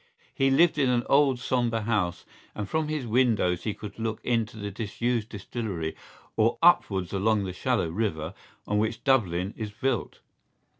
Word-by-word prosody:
He 135 -2 +2
lived 160 +3 +4
in 135 -3 +3
an 120 -1 +2
old 140 -2 +4
sombre 120 -2 0
house 105 -6 -1 0.3
and 105 -2 -4
from 160 +4 -1
his 150 -4 -2
windows 110 -7 +2
he 105 - -1
could 105 0 -9
look 110 -1 -2
into 115 -3 0
the 105 -1 -5
disused 115 +2 -2
distillery 100 -6 -4 0.4
or 115 +1 +2
upwards 100 - +4
along 105 +1 +2
the 95 -2 -4
shallow 120 -2 0
river 85 -3 -2 0.3
on 105 0 0
which 110 +1 -1
Dublin 100 -8 +1
is 110 -2 -4
built. 130 +6 -2
110 Hz, 160 wpm, -27 LUFS, 100-125 Hz, 0.4 s, lived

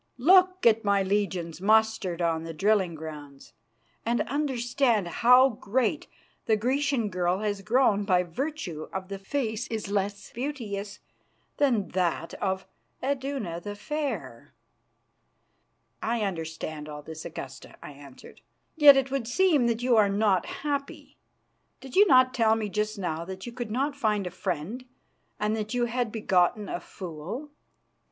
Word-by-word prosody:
Look 370 +6 +5
at 225 0 +5
my 200 -1 +2
legions 190 -4 -2
mustered 215 -4 +2
on 165 -1 0
the 165 -1 -7
drilling 195 -2 +2
grounds, 150 -3 -10 0.5
and 235 +1 +1
understand 245 -6 0
how 250 +9 +5
great 240 +5 -1 0.4
the 220 -1 +3
Grecian 260 0 0
girl 180 +1 0
has 205 -2 -2
grown 215 -2 +2
by 180 -3 +3
virtue 180 - -5
of 190 0 -5
the 195 -1 -5
face 225 +1 -2
which 225 - -1
is 200 -2 -7
less 200 0 -2
beauteous 215 -7 -5 0.6
than 245 -9 +2
that 175 -2 -1
of 190 -1 -1 0.4
Iduna 265 -10 -2
the 205 +2 -6
Fair!" 295 +6 -5 1.5
"I 230 0 -1
understand 160 -5 -4
all 150 0 -8
this, 160 +1 -8
Augusta," - - -9
I - - -8
answered. 140 -2 -14 0.3
"Yet 290 -3 +9
it 270 0 0
would 270 -4 -2
seem 300 -2 +3
that 235 0 -1
you 245 -2 +4
are 205 -2 +5
not 200 -2 +2 0.2
happy. 285 -1 -4 0.6
Did 265 -1 -10
you 410 +2 +7
not 255 -3 +5
tell 225 -3 +3
me 215 -2 -3
just 210 +1 -2
now 170 -4 -3
that 190 +1 -7
you 240 - -6
could 240 -2 -5
not 275 +6 -1
find 215 -7 0
a 180 - -4
friend 185 - -4 0.6
and 210 +1 0
that 215 +2 -4
you 245 -1 +2
had 240 -1 -2
begotten 205 -1 +1
a - - -3
fool?" 185 - -7
215 Hz, 150 wpm, -27 LUFS, 185-255 Hz, 1.5 s, Yet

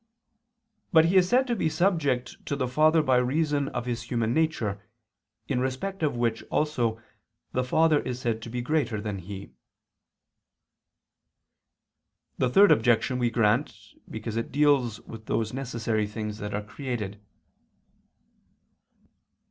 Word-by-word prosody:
But 160 -3 +6
He 175 +3 +1
is 185 -1 +5
said 255 +2 +4
to 240 -2 -1
be 165 -7 0
subject 155 -7 0
to 145 - -1
the 130 -2 -1
Father 155 +5 +3
by 130 -3 +3
reason 145 +3 +1
of 125 -2 -4
His 120 -2 -3
human 115 -1 -1
nature, 120 -11 0 0.7
in 130 -3 0
respect 135 +10 -3
of 150 -5 0
which 115 -1 0
also 120 -7 0 0.5
the 130 - 0
Father 155 +4 +3
is 125 -2 -4
said 115 -3 -2
to 115 - -8
be 120 +1 -3
greater 125 -6 0
than 105 -2 -4
He. 95 0 -9 2.9
The 125 - +2
third 195 +7 +6
objection 120 -1 +3
we 120 -1 +2
grant, 115 +3 +1 0.3
because 110 0 -5
it 115 - -3
deals 140 -6 +2
with 110 -1 -11
those 110 0 -1
necessary 115 -5 -2
things 105 0 -5
that 105 -1 -4
are 105 - -3
created. 105 -3 -5
125 Hz, 140 wpm, -27 LUFS, 110-150 Hz, 2.9 s, But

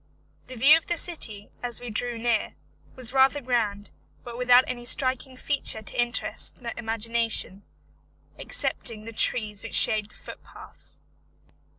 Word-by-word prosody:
The 255 - -9
view 275 +6 +7
of 325 - -8
the 345 - -1
city, 220 - -1
as 245 -1 -4
we 245 -2 -7
drew 240 +2 -2
near, 230 -1 -1 0.4
was 250 -1 -2
rather 270 +2 +4
grand, 225 -6 -2 0.3
but 240 -1 -9
without 250 +1 +5
any 245 -1 -5
striking 255 +1 0
feature 265 -6 0
to 240 - -1
interest 240 +1 -3
the 235 - -5
imagination, 225 -3 -2 0.8
excepting 215 -2 -3
the 230 - -8
trees 210 -3 +2
which - - -5
shade 215 -1 +5
the - - -19
footpaths. - - -13
240 Hz, 145 wpm, -26 LUFS, 220-255 Hz, 0.8 s, view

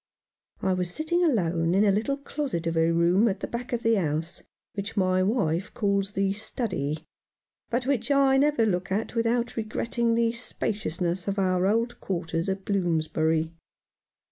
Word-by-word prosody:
I 190 - +2
was 180 -1 -1
sitting 345 - 0
alone 175 - +2
in 205 +2 +4
a 200 - +5
little 225 +8 0
closet 280 - -3
of 165 0 -1
a 165 0 +3
room 175 +6 +4
at 200 -2 -1
the - - -1
back 240 +1 -5
of 240 -1 -2
the 225 - +4
house, 160 0 -2 0.3
which 205 +2 -5
my 185 -1 +3
wife 185 -3 0
calls 200 -2 0
the 195 0 +1
study, 185 - -3 0.6
but 245 +1 -1
which 260 -2 0
I 275 -1 +4
never 285 -4 +3
look 185 -2 -1
at 210 +4 -1
without 235 +1 0
regretting 230 +1 -1
the 230 0 +2
spaciousness 190 -6 -3
of 200 0 -1
our 185 -1 +2
old 230 +3 0
quarters 170 -1 -2
at 190 0 -3
Bloomsbury. 160 -3 0
200 Hz, 165 wpm, -26 LUFS, 175-235 Hz, 0.6 s, a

